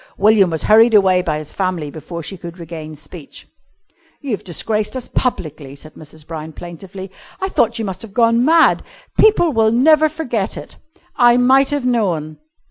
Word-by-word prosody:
William 205 -2 +4
was 160 -2 -2
hurried 225 +1 +5
away 190 -3 +4
by 155 -4 -2
his 155 -1 -8
family 180 -6 -2
before 170 +2 -8
she 195 - -6
could 170 -1 -10
regain 160 -2 -8
speech. 150 +2 -11 0.7
"You've 255 -9 -4
disgraced 215 +5 -2
us 255 - -6
publicly," 155 - -3
said 155 +2 -14
Mrs. 155 0 -13
Brown 160 -1 -7
plaintively. 185 +4 -9 0.3
"I 380 - -2
thought 230 - +1
you 225 - -3
must 190 -2 -5
have 225 - -8
gone 230 +2 +2
mad. 325 +4 +4 0.4
People 380 -7 +4
will 220 -1 +3
never 310 +6 +4
forget 245 -10 -3
it. - - -9 0.4
I 240 -1 +5
might 265 +2 +4
have 290 -3 -2
known...." 170 -11 -1
195 Hz, 170 wpm, -18 LUFS, 165-240 Hz, 0.7 s, hurried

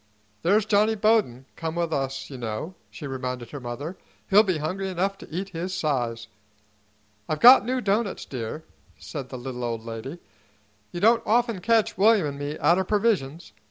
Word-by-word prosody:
"There's 200 +5 +3
Johnny 215 +1 +3
Bowden 205 - +2
come 165 0 -4
with 170 -2 -1
us, 135 0 -3
you 135 - -7
know," 115 +9 -4 0.2
she 150 - -9
reminded 125 -3 -5
her 145 - -6
mother. 135 +8 -6 0.3
"He'll 205 +2 +8
be 185 -6 0
hungry 185 +6 -3
enough 190 +2 -1
to - - -12
eat 185 +5 -4
his 180 +1 -4
size." 120 -9 -2 1.0
"I've 155 - -1
got 245 -2 +9
new 255 0 0
doughnuts, 205 -1 -1
dear," 125 +4 -6 0.3
said 140 -5 -7
the 130 - -6
little 125 0 -6
old 115 -1 -3
lady. 115 +7 -6 0.7
"You 175 - -5
don't 230 +2 +5
often 230 -2 +1
catch 225 -2 +2
William 210 -3 +5
'n' 140 -1 -4
me 145 +1 -4
out 175 +2 +3
o' - - +1
provisions. 180 - -1
165 Hz, 175 wpm, -25 LUFS, 130-200 Hz, 1.0 s, got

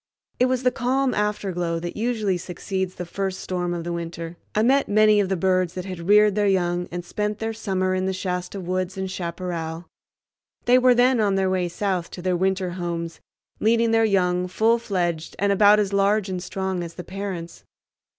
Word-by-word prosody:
It 250 - +4
was 255 0 0
the 250 - +3
calm 260 +1 0
afterglow 190 -5 -1
that 175 0 -5
usually 215 -4 0
succeeds 185 +2 -4
the 180 - -5
first 190 +2 -3
storm 180 -1 -2
of 170 -1 -3
the 175 +1 -3
winter. 170 0 -5 0.2
I 215 - +3
met 270 +4 +3
many 215 0 +5
of 195 -2 +1
the 190 - +1
birds 185 -1 +1
that 185 -1 -4
had 185 -2 -6
reared 210 0 +6
their 205 0 +1
young 180 -2 +1
and 175 0 -5
spent 210 +3 -2
their 225 0 -3
summer 190 -4 -1
in 185 0 0
the - - +1
Shasta 180 +1 -3
woods 185 +1 -3
and 190 0 -3
chaparral. 170 -2 -4 0.8
They 250 +1 +6
were 250 -1 +5
then 250 0 +4
on 205 -2 +2
their 190 -1 +1
way 180 -2 0
south 180 -1 -2
to - - -6
their 185 -1 +1
winter 190 0 0
homes, 170 -2 -4 0.4
leading 230 +1 +3
their 225 0 +4
young 180 -4 +2
full 225 +5 +2
fledged 175 -7 -2
and 200 0 +1
about 205 +1 +6
as 200 -1 0
large 200 0 +2
and 185 -1 -3
strong 190 0 -3
as 170 0 -8
the 180 - -7
parents. 185 -3 -6
190 Hz, 200 wpm, -23 LUFS, 180-210 Hz, 0.8 s, reared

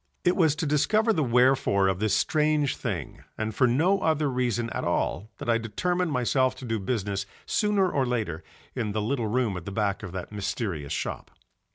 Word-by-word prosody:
It 180 - +3
was 160 -5 +3
to 160 +2 -2
discover 215 +10 +2
the 155 - +1
wherefore 125 -5 +3
of 95 -1 0
this 105 -1 +2
strange 150 +1 +2
thing 90 - -5 0.2
and 110 0 -2
for 125 +4 +3
no 165 +11 +3
other 155 -5 +1
reason 120 -2 -1
at - - -3
all 95 +11 -1
that - - -7
I 115 -1 +3
determined 175 - -1
myself 130 0 +1
to 130 - -9
do 115 -2 -1
business 100 -2 -2 0.2
sooner 210 -3 +2
or 140 -7 0
later 105 -10 -2 0.3
in 110 -5 -2
the 110 - -1
little 115 0 -1
room 115 -2 0
at 90 - -8
the 100 - -5
back 100 -1 -1
of 100 -4 -7
that 95 0 -6
mysterious 95 - -3
shop. - - -3
120 Hz, 195 wpm, -27 LUFS, 100-150 Hz, 0.3 s, It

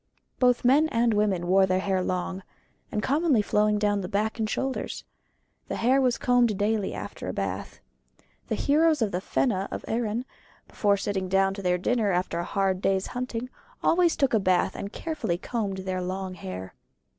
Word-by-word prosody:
Both 250 -1 +3
men 290 +5 +5
and 230 -2 +2
women 205 -4 +1
wore 190 +2 +4
the 185 0 +2
hair 190 -1 0
long, 185 +1 -2 0.5
and 210 - -2
commonly 285 -5 +2
flowing 210 0 +2
down 205 -1 +1
on - - -3
the 180 - -4
back 215 +3 -1
and 215 -1 0
shoulders. 265 +3 -3 0.6
The - - -3
hair 260 +4 +3
was 250 -2 +2
combed 245 -4 +2
daily 210 -1 0
after - - -7
a - - -3
bath. - - -4 0.7
The - - -1
heroes 310 -1 +3
of 210 - -1
the 180 - -2
Fena 195 -2 0
of - - -6
Erin, 230 +1 -1 0.4
before 205 -1 +1
sitting 195 -2 -2
down 195 0 +3
to 195 - -6
their 180 -1 +1
dinner 215 +2 +1
after 180 -1 -1
a - - -1
hard 190 0 0
day's 195 -1 +1
hunting, 250 0 -4 0.3
always 345 0 +3
took 275 -3 +1
a 220 - +4
bath 185 -2 +2
and 200 - -5
carefully 310 - -3
combed 200 -1 -3
their 185 -1 -2
long 185 +1 -4
hair. 95 - -7
205 Hz, 185 wpm, -26 LUFS, 190-245 Hz, 0.7 s, men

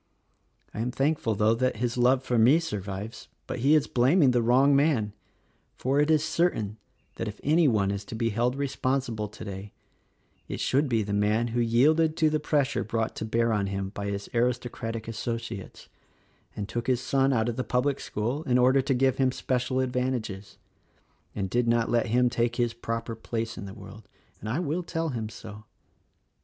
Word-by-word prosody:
'"I - - -6
am 115 +2 -1
thankful 135 -4 0
though 105 +2 +3
that 130 +2 0
his 120 +1 -2
love 125 +2 +3
for 120 -3 +1
me 130 +9 +6
survives; 105 - -5 0.2
but - - -5
he 140 +6 +4
is 150 - +3
blaming 130 +3 +4
the 120 -1 +2
wrong 130 +4 +4
man, 135 -8 +2 0.6
for 135 +3 +1
it 150 +1 +3
is 155 -1 +4
certain 110 - 0 0.4
that 115 - -3
if 105 0 -7
any 155 +2 +4
one 100 -5 +2
is 100 +1 -4
to 115 - -7
be 115 0 0
held 120 +4 0
responsible 130 -5 -1
today, 100 -1 -8 0.7
it - - -5
should 140 +2 +1
be 115 -3 +1
the 100 0 -4
man 105 +3 +1
who 120 +1 -1
yielded 155 +8 +3
to 155 -1 +3
the 155 - +1
pressure 145 -2 0
brought 110 +1 -2
to - - -4
bear 115 +1 +1
on 100 -2 0
him 95 0 -3
by 100 0 -5
his 100 0 -4
aristocratic 115 -2 -2
associates 115 -3 -5 0.7
and 100 - -4
took 120 +2 -4
his 125 -2 +2
son 135 +1 +1
out 115 -3 +1
of 120 - -2
the 130 - -2
public 130 +3 0
school 120 +8 -3
in 125 - +4
order 130 +2 +4
to 135 0 0
give 130 0 +2
him 130 -1 +2
special 130 0 -1
advantages, 125 -6 -3 0.8
and 100 -2 -2
did 120 +5 0
not 115 0 +2
let 120 -1 +2
him 125 +2 +3
take 120 0 0
his 120 -2 0
proper 115 0 -4
place 115 0 -4
in - - -7
the 95 - -9
world 100 +2 -12 0.2
— - - -35
and 110 - -6
I 120 - -1
will 170 0 -1
tell 165 -1 -3
him 115 -5 -4
so." 110 -1 -10
120 Hz, 195 wpm, -27 LUFS, 110-135 Hz, 0.8 s, me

